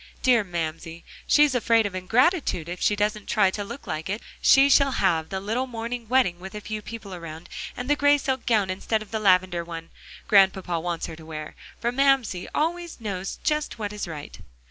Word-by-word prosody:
Dear 245 -4 +4
Mamsie! 165 -2 -5 0.2
she's 295 -2 +5
afraid 230 -2 +3
of 200 - -3
ingratitude 225 - +1
if 175 +1 -6
she 210 - +3
doesn't 210 0 -1
try 200 -4 +3
to 205 - -4
like 195 - -6
it. 210 +3 -3 0.2
She 270 +1 +6
shall 280 -1 +4
have 165 -4 +1
the 190 - -3
little 225 +7 -2
morning 235 -1 -5
wedding 245 -9 +2
with 190 +2 -9
a - - -4
few 215 0 -5
people 210 -3 -8
around, 165 -2 -8 0.3
and 250 - -4
the 290 - +3
gray 290 0 +4
silk 265 -2 -3
gown 210 -5 +2
instead 215 +3 -1
of 210 - -19
the 220 - -1
lavender 185 -3 +3
one 165 -1 -8 0.4
Grandpapa 190 -4 +4
wants 170 0 -3
her 160 - -7
to 160 - -12
wear, 155 -1 -7 0.3
for 235 - 0
Mamsie 260 -8 +2
always 340 +1 -2
knows 195 -4 -4
just 300 -3 -1
what 210 -2 -4
is 210 - -4
right." 150 -3 -8
210 Hz, 195 wpm, -25 LUFS, 180-245 Hz, 0.4 s, She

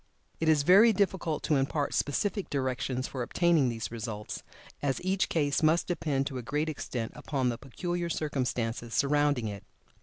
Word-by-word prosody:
It 160 - +2
is 150 -2 +4
very 200 +8 +7
difficult 185 -5 0
to 150 - +2
impart 140 +2 0
specific 195 +7 -1
directions 130 -2 -1
for 130 - -5
obtaining 160 +1 +3
these 115 -1 -4
results, 110 -2 -5 0.4
as 135 -2 0
each 190 0 +1
case 145 -3 +1
must 160 +2 +3
depend 150 -6 -1
to 135 -3 -4
a - - -4
great 150 +6 -1
extent 120 -6 -4
upon 135 -4 -1
the 115 - -3
peculiar 175 +6 -3
circumstances 125 -7 -2
surrounding 145 -4 +2
it. 100 -2 -6
145 Hz, 160 wpm, -29 LUFS, 125-165 Hz, 0.4 s, very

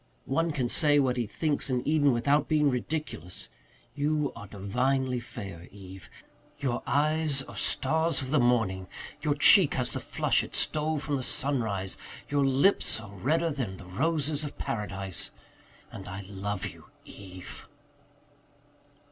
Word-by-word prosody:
One 165 +5 +1
can 135 -6 -1
say 145 +3 +3
what 130 -3 +2
he 120 -3 -1
thinks 145 +4 -1
in 125 -1 -1
Eden 145 -2 +4
without 140 +5 +2
being 150 -2 +3
ridiculous. 125 - -4 0.4
You 150 0 0
are 110 -3 -9
divinely 125 +6 0
fair, 95 -8 -8
Eve. 95 -3 -12 0.5
Your 130 -4 -2
eyes 150 -1 +1
are - - -11
stars 160 +2 +1
of 130 -1 -4
the 150 - +4
morning 110 -7 +1 0.3
your 150 -2 +1
cheek 170 +2 +7
has 125 -1 +1
the - - -1
flush - - +1
it - - -5
stole 155 +1 +1
from 145 -1 -2
the 130 - -4
sunrise 110 -10 0 0.3
your 145 -1 +2
lips 135 - +3
are 105 -3 -11
redder 160 - 0
than 120 -10 -4
the 95 - -11
roses 150 - 0
of 145 - -6
paradise. 100 -4 -4 0.6
And - - -9
I 95 +2 -6
love 100 -1 -3
you, - - -8 0.2
Eve." 95 -2 -10
130 Hz, 150 wpm, -28 LUFS, 100-150 Hz, 0.6 s, cheek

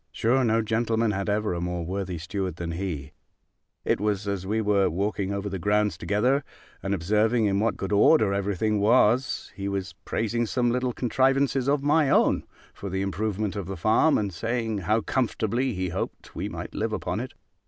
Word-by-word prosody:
Sure 125 +4 +2
no 115 -1 +2
gentleman 115 0 +1
had 100 0 -2
ever 105 -1 0
a 85 - -3
more 90 -1 -3
worthy 95 0 -3
steward 90 +1 -3
than 85 -1 -4
he: 80 -5 -4 0.7
it - - +1
was 105 -1 -1
as 95 -2 -3
we 110 +2 0
were 100 -2 +2
walking 100 +2 -1
over 100 0 -3
the 95 -2 -4
grounds 105 +3 +1
together, 125 +8 +1 0.4
and 100 +1 -1
observing 105 +6 +2
in 100 -1 +1
what 110 +1 0
good 95 - -4
order 105 0 +5
every 100 0 -1
thing 105 +2 +1
was, 120 +4 +2
he 100 +1 -4
was 100 -1 -3
praising 115 +1 -1
some 120 +1 +1
little 125 +1 0
contrivances 135 +2 +1
of 140 -1 +1
my 150 0 +3
own, - - +3 0.3
for 100 - -7
the 95 +1 -1
improvement 105 +1 -2
of 100 -4 -4
the 95 -1 -5
farm, 110 - +3
and 100 -3 -2
saying, 115 +2 -2
how 105 +5 +1
comfortably 125 +1 0
he 90 0 -2
hoped 90 +3 -5
we - - -4
might - - -7
live 110 0 -2
upon 90 -1 -2
it. 125 +2 -6
105 Hz, 190 wpm, -26 LUFS, 95-115 Hz, 0.7 s, order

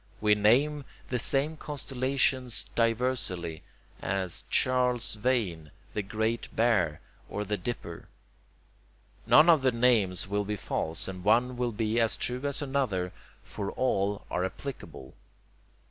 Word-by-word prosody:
We 105 -1 +4
name 130 +8 +3 0.3
the 125 - -1
same 140 +6 +2
constellation 130 -2 0 0.2
diversely, 115 -9 -1 0.4
as 95 -3 -2
Charles's 125 -4 +1
Wain, 95 -12 0 0.2
the 105 - -1
Great 110 +3 -2
Bear, 95 -10 +2 0.3
or 105 - -3
the 105 +1 -1
Dipper. 90 -4 -6 1.2
None 155 +2 +7
of 165 -4 +6
the 130 -1 +3
names 115 -7 +2
will 105 +1 0
be 105 +1 -3
false, 80 -4 -2
and 90 -1 -7
one 120 +5 +3
will 120 -1 -1
be 110 +1 0
as 115 -1 +1
true 125 +1 -2
as 140 +1 -1
another, 125 -11 -1 0.3
for 100 -1 -5
all 100 -5 0
are 90 - 0
applicable. 95 - -7
115 Hz, 130 wpm, -29 LUFS, 95-130 Hz, 1.2 s, None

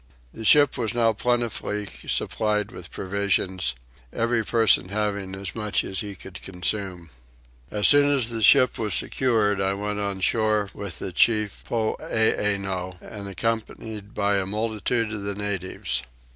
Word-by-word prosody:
The 110 - -8
ship 145 +6 +5
was 115 -1 -1
now 115 -2 +3
plentifully 115 -3 -1
supplied 105 +1 -1
with 90 -1 -10
provisions; 95 -7 -1 0.4
every 115 0 0
person 110 -5 +3
having 100 -2 -2
as 95 0 -6
much 105 -2 -1
as 95 -1 -5
he 100 0 -5
could 90 0 -11
consume. 90 -2 -4 0.6
As 105 +2 +3
soon 145 0 +6
as 130 -5 +2
the 115 -1 -3
ship 130 +3 +6
was 105 -3 0
secured 110 -6 +1
I 95 0 0
went 105 +1 -3
on 100 -1 -2
shore 105 0 +1
with 100 -5 -6
the - - -5
chief 105 +2 +2
Poeeno, 100 -5 0
and 100 0 -9
accompanied 110 0 -4
by 100 0 +1
a 95 -1 -1
multitude 110 +2 -1
of 105 - -4
the 100 0 -4
natives. 95 -10 -2
105 Hz, 145 wpm, -24 LUFS, 95-110 Hz, 0.6 s, soon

